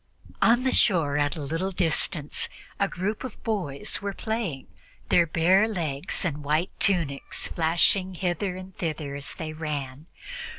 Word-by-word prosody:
On 240 Hz, +2 st, +5 dB
the 260 Hz, -, +2 dB
shore, 165 Hz, -8 st, +3 dB
at 145 Hz, +2 st, +1 dB
a 155 Hz, -, -5 dB
little 165 Hz, +7 st, -1 dB
distance, 165 Hz, -4 st, 0 dB, 0.3 s
a 200 Hz, -, +3 dB
group 200 Hz, +5 st, -3 dB
of 260 Hz, -4 st, -8 dB
boys 165 Hz, -7 st, -2 dB
were 200 Hz, 0 st, -2 dB
playing, 220 Hz, -, -3 dB, 0.4 s
their 170 Hz, -1 st, +5 dB
bare 185 Hz, +7 st, +4 dB
legs 170 Hz, -5 st, 0 dB
and 150 Hz, -3 st, -2 dB
white 155 Hz, +5 st, +1 dB
tunics 165 Hz, -8 st, +1 dB
flashing 175 Hz, +3 st, +2 dB
hither 180 Hz, +1 st, -1 dB
and 185 Hz, 0 st, -9 dB
thither 155 Hz, -4 st, -3 dB
as 140 Hz, 0 st, -3 dB
they 155 Hz, -1 st, -5 dB
ran. 150 Hz, -2 st, -4 dB
170 Hz, 145 wpm, -27 LUFS, 150-195 Hz, 0.4 s, On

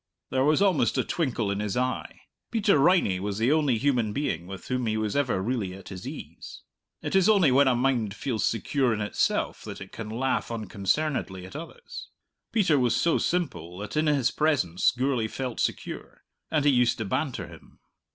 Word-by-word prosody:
There 130 Hz, 0 st, +2 dB
was 155 Hz, +6 st, +4 dB
almost 190 Hz, -6 st, +2 dB
a -, -, +2 dB
twinkle 120 Hz, -10 st, -1 dB
in 100 Hz, -, -2 dB
his 105 Hz, +1 st, -2 dB
eye. 125 Hz, 0 st, -2 dB, 0.3 s
Peter 205 Hz, -8 st, +3 dB
Riney 140 Hz, -, +3 dB
was 100 Hz, +1 st, -3 dB
the 115 Hz, +5 st, +2 dB
only 150 Hz, -6 st, +3 dB
human 120 Hz, -5 st, +1 dB
being 90 Hz, -, -2 dB
with 95 Hz, 0 st, -8 dB
whom 125 Hz, -2 st, -1 dB
he 110 Hz, 0 st, 0 dB
was 110 Hz, -1 st, -1 dB
ever 135 Hz, -9 st, +1 dB
really 105 Hz, -5 st, -2 dB
at 95 Hz, -, -11 dB
his 95 Hz, -2 st, -7 dB
ease. -, -, -9 dB, 0.4 s
It -, -, -2 dB
is 190 Hz, +2 st, +5 dB
only 190 Hz, -10 st, +5 dB
when 135 Hz, +2 st, +5 dB
a 130 Hz, -, +4 dB
mind 120 Hz, -5 st, 0 dB
feels 120 Hz, -5 st, -2 dB
secure 120 Hz, +2 st, +1 dB
in 105 Hz, -, -4 dB
itself 105 Hz, -, 0 dB
that -, -, -7 dB
it -, -, -10 dB
can 110 Hz, -2 st, -7 dB
laugh 130 Hz, +4 st, -1 dB
unconcernedly 110 Hz, -1 st, -2 dB
at 95 Hz, -, -12 dB
others. 170 Hz, -, -9 dB, 0.4 s
Peter 180 Hz, -11 st, +3 dB
was 125 Hz, -2 st, +2 dB
so 170 Hz, -, +2 dB
simple 90 Hz, -, -2 dB
that 105 Hz, +1 st, -6 dB
in 155 Hz, +1 st, +2 dB
his 140 Hz, -4 st, +2 dB
presence 130 Hz, -, +2 dB
Gourlay 125 Hz, -2 st, 0 dB
felt 125 Hz, +1 st, -5 dB
secure; -, -, -4 dB, 0.3 s
and 150 Hz, -2 st, +1 dB
he 145 Hz, -, +6 dB
used 125 Hz, -2 st, +3 dB
to 110 Hz, -, -3 dB
banter 100 Hz, -, -2 dB
him. 85 Hz, -2 st, -15 dB
125 Hz, 190 wpm, -27 LUFS, 105-145 Hz, 0.4 s, he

